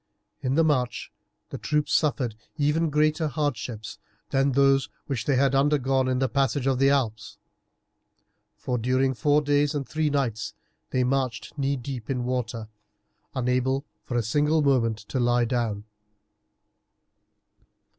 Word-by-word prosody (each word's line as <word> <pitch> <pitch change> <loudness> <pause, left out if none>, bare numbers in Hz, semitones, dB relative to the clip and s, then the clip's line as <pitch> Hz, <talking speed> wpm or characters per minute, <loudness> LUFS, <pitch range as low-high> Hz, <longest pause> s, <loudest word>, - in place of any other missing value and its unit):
In 130 +1 0
the 165 - +4
march 125 -6 0 0.4
the - - -5
troops 150 0 0
suffered 135 -6 +1 0.2
even 150 +3 +2
greater 155 +2 +2
hardships 125 -6 -3 0.3
than 135 0 +2
those 135 0 +3 0.2
which 135 -5 -3
they 140 - +2
had 135 +1 +3
undergone 135 -2 +2
in 130 0 +1
the 130 +1 +1
passage 135 +1 0
of 135 -2 +1
the 135 0 +5
Alps, 110 -6 -1 1.2
for 125 -1 -3
during 130 +3 +1
four 145 +6 +2
days 145 +1 +2
and 140 -2 -3
three 155 -1 0
nights 125 -7 -2 0.3
they 130 - +1
marched 130 -2 -1
knee 140 -1 0
deep 125 -2 -6
in 125 -2 -1
water, 120 -3 -3 0.7
unable 130 +2 0 0.2
for 120 - -3
a 120 - +1
single 150 +7 +2
moment 120 -6 +2
to 110 +4 -5
lie 120 0 +3
down. 115 -4 -1
135 Hz, 140 wpm, -26 LUFS, 120-145 Hz, 1.2 s, the